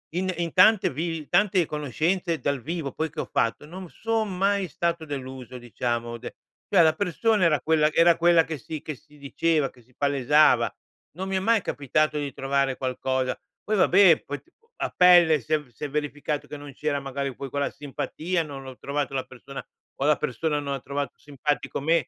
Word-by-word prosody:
in 185 +1 0
in 170 -1 -2
tante 200 +2 +6
vivi 165 +4 -3
in 150 - -12
tante 185 -1 +3
conoscenze 160 +4 -1
dal 140 -2 -1
vivo 160 +1 -4
poi, 160 0 -2
che 155 - -4
ho - - -8
fatto 115 +5 0
non 180 +2 -9
son 220 -4 -2
mai 195 0 +1
stato 170 +2 -2
deluso, 130 -3 -7
diciamo 120 -1 -3
de - - -9 0.3
cioè 185 -4 +5
la 160 -1 +4
persona 205 +1 +1
era 150 -5 +3
quella 155 0 +3
era 170 0 +5
quella 170 -1 +5
che 160 -1 -4
si 155 +2 -7
che 155 - -6
si 150 +4 -21
diceva, 150 +1 0
che 125 - -21
si 125 +2 -28
palesava. 145 +1 +3 0.4
Non 190 +2 -4
mi 190 - 0
è - - +1
mai 225 +3 +3
capitato 150 0 0
di 140 -2 -4
trovare 135 0 0
qualcosa 130 0 -1 0.3
poi 215 - 0
vabbè 185 -2 +5
poi 145 0 -5
t - - -31
u 460 - -33
a - - -2
pelle 175 -4 +7
si 115 - -3
è 155 - +4
v 145 - -19
si 120 - -12
è - - -5
verificato 150 0 -3
che 150 - -7
non 145 -1 -10
c'era 150 0 -1
magari 135 0 -4
poi 135 - -6
quella 140 +1 -1
simpatia, 155 +5 -3
non 140 -3 -8
ho 130 -1 -9
trovato 140 0 -3
la 130 - -1
persona 130 +2 -10 0.3
o 135 - 0
la 150 0 +4
persona 150 +3 -1
non 140 -1 -3
ha 135 - -3
trovato 140 -1 -4
simpatico 145 +1 -3
me. 160 -2 +2
150 Hz, 205 wpm, -25 LUFS, 140-170 Hz, 0.4 s, pelle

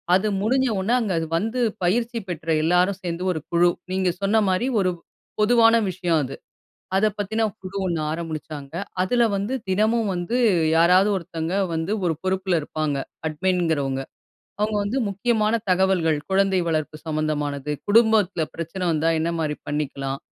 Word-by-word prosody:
அது 190 +3 +2
முடிஞ்ச 260 +5 +2
உடனே 195 +5 0
அங்க 210 -7 -1 0.2
வந்து 225 +7 -2 0.3
பயிற்சி 230 +5 0
பெற்ற 165 -2 -6 0.2
எல்லாரும் 180 +4 +2
சேர்ந்து 175 0 -3
ஒரு 160 - -4
குழு 175 +1 +4 0.2
நீங்க 185 -1 +1
சொன்ன 210 +3 +3
மாரி 185 +7 +1
ஒரு 185 -1 +2 0.5
பொதுவான 230 +1 +5
விஷயம் 175 -3 0
அது. 130 - -5 0.6
அத 205 +3 +4
பத்தின 220 +2 -1 0.2
குழு 190 +1 -7
ஒண்ணு 170 -3 -1
ஆரம்பிச்சாங்க. 155 -3 -6 0.3
அதில 240 +5 +2
வந்து 200 +6 -2 0.2
தினமும் 215 +3 +2
வந்து 175 +7 -2 0.4
யாராவது 180 +5 +5
ஒருத்தங்க 165 -1 -4 0.2
வந்து 160 +5 -2
ஒரு 165 -2 +1
பொறுப்புல 190 0 0
இருப்பாங்க 155 -1 -2 0.3
அட்மின்கிறவங்க. 160 -5 0 0.6
அவங்க 210 0 0
வந்து 205 +6 -2
முக்கியமான 215 +2 +1
தகவல்கள் 180 -4 +2
குழந்தை 195 0 +2
வளர்ப்பு 155 -2 -1
சம்மந்தமானது, 150 -2 -2 0.2
குடும்பத்தில 210 -4 +4
பிரச்சனை 165 +3 -6
வந்தா 160 +1 +1
என்ன 165 +1 0
மாரி 155 -2 -1
பண்ணிக்கலாம்? 140 -2 -3
185 Hz, 140 wpm, -23 LUFS, 160-205 Hz, 0.6 s, பொதுவான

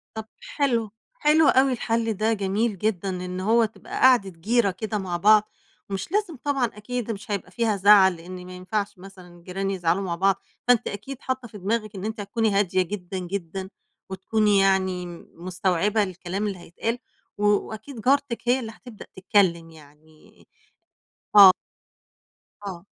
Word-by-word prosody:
طَب 220 -1 -5 0.2
حلو، 275 - -1 0.2
حلو 310 - +3
أوي 265 +1 +4
الحَلّ 230 -1 -1
ده 215 +3 0
جميل 205 +1 -1
جدًا، 200 -1 -1
إن 180 0 -4
هو 225 +4 +3
تبقى 220 - -8
قعدة 250 -6 +5
جيرة 200 +5 +1
كده 215 +4 -4
مع 185 -3 -3
بعض، 215 +3 +5 0.4
مش 195 - -4
لازم 400 -5 -1
طبعًا 280 -3 +1
أكيد، 230 +2 -5
مش 210 0 -7
هيبقى 195 -2 -3
فيها 225 +1 0
زَعَل 195 -1 +6
لإن 180 +2 -10
ما 185 - -10
ينفعش 200 +2 -3
مثلًا 180 -2 -14
جيران 195 +2 -3
يزعلوا 180 0 0
مع 175 -2 -2
بعض، 195 +2 +2 0.3
فأنتِ 245 -2 +4
أكيد 255 +6 -7
حَاطَّة 260 -1 -3
في 215 - -11
دماغِك 210 +2 -2
إن 190 - -6
أنتِ 220 +1 -4
هتكوني 220 +2 0
هادية 190 -2 +2
جدًا، 190 0 -5
جدًا، 185 0 -5 0.4
وتكوني 205 +2 +1
يعني 190 -2 +1 0.3
مستوعبة 185 +4 0
الكلام 185 +2 -4
اللي 195 -2 -4
هيتقال، 200 +7 -4 0.4
و 210 - -1
وأكيد 220 +4 -1
جارتِك 270 0 +1
هي 255 +2 +4
اللي 225 -3 -6
هتبدأ 225 -1 -13
تِتكلَّم 180 -4 +2
يعني 155 0 -20 0.9
آه. 195 -2 +11 1.2
آه. 180 -2 -7
200 Hz, 155 wpm, -24 LUFS, 185-225 Hz, 1.2 s, آه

